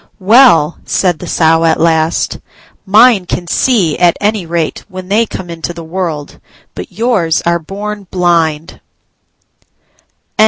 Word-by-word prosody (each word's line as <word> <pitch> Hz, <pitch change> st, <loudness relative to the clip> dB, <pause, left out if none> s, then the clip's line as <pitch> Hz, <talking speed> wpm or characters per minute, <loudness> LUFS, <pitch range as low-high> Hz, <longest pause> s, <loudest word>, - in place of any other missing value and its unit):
"Well," 190 Hz, -, +4 dB
said 180 Hz, -5 st, 0 dB
the 180 Hz, -, -8 dB
Sow 165 Hz, 0 st, +2 dB
at 165 Hz, -, +2 dB
last, 160 Hz, 0 st, 0 dB, 0.5 s
"mine 210 Hz, -2 st, +4 dB
can 175 Hz, -, -3 dB
see, 180 Hz, -, 0 dB
at 175 Hz, -1 st, +3 dB
any 205 Hz, -4 st, -1 dB
rate, 165 Hz, -1 st, -3 dB
when 185 Hz, -1 st, -9 dB
they 220 Hz, +3 st, +2 dB
come 190 Hz, -, -7 dB
into 170 Hz, 0 st, -6 dB
the 170 Hz, -, -8 dB
world: 160 Hz, -3 st, -5 dB, 0.3 s
but -, -, -8 dB
yours 215 Hz, -9 st, 0 dB
are 170 Hz, 0 st, +1 dB
born 200 Hz, +4 st, -7 dB
blind." 165 Hz, -3 st, -1 dB
175 Hz, 130 wpm, -12 LUFS, 165-205 Hz, 0.5 s, Well